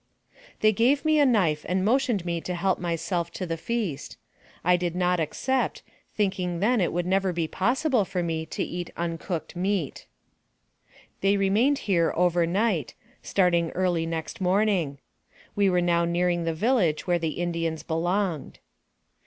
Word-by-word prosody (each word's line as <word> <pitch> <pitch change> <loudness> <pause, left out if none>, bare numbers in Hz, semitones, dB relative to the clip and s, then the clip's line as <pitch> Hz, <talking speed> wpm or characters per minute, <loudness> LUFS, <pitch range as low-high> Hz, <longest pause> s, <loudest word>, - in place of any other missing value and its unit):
They 215 - +5
gave 250 +8 +2
me 310 -1 +4
a 285 - +5
knife 175 -11 +2
and 185 +1 +1
motioned 235 -5 +1
me 170 -1 -2
to 180 - -4
help 185 +2 0
my 170 -1 -1
self 170 +1 -2
to 185 - -4
the 165 -1 -2
feast. 195 -4 -4 0.5
I 180 +1 +4
did 175 -1 -2
not 180 -1 +1
accept, 260 - -1 0.3
thinking 185 -4 -1
then 225 +3 +2
it 175 - +1
would 175 0 -1
never 190 +1 +1
be 170 -2 -1
possible 250 - +1
for 180 -1 -3
me 160 -1 -2
to - - -3
eat 175 0 -5
uncooked 170 0 -4
meat. 185 -4 -2 1.1
They 195 +1 +2
remained 215 +9 +3
here 170 -5 +2
over 175 -1 +3
night, 190 - 0 0.3
starting 175 -3 +2
early 175 -3 0
next 165 +2 -5
morning. 185 -6 +1 0.6
We 200 -1 +3
were 180 -1 +2
now 170 -1 +2
nearing 175 0 0
the 165 - 0
village 190 -5 +1
where 175 -1 +1
the 160 -2 -3
Indians 165 -2 -2
belonged. 175 -1 -1
180 Hz, 160 wpm, -26 LUFS, 170-200 Hz, 1.1 s, They